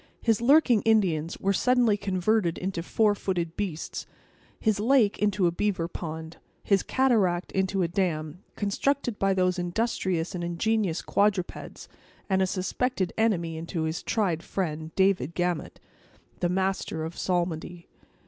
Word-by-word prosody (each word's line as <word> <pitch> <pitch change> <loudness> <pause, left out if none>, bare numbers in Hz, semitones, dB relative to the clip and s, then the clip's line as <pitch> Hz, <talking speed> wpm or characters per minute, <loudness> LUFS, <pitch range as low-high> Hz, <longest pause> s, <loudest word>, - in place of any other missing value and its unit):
His 225 -1 +1
lurking 250 -3 +5
Indians 180 -8 +2
were 195 +1 +1
suddenly 245 0 +3
converted 190 -2 0
into 185 -2 -3
four 210 +4 +2
footed 175 -4 -2
beasts; 180 -6 -4 0.5
his 215 -3 +1
lake 230 -2 +3
into 205 -2 +2
a 170 - +3
beaver 180 -2 -1
pond; 160 -1 -7 0.3
his 195 -2 +3
cataract 205 -10 +1
into 190 0 0
a - - +1
dam, 170 -2 -2
constructed 240 +3 -1
by 195 -1 +2
those 185 -1 +1
industrious 180 -2 -1
and 175 -2 -4
ingenious 175 +1 0
quadrupeds; 200 -3 -1 0.4
and 190 -1 +2
a 190 - +2
suspected 190 +1 -1
enemy 180 -8 +1
into 165 0 -3
his 160 +1 -2
tried 185 -8 0
friend, 160 -4 -3
David 190 -6 +2
Gamut, 175 -3 -2 0.6
the 175 - +1
master 190 -3 -1
of 160 +1 -5
psalmody. 175 -1 -2
185 Hz, 140 wpm, -27 LUFS, 170-210 Hz, 0.6 s, lurking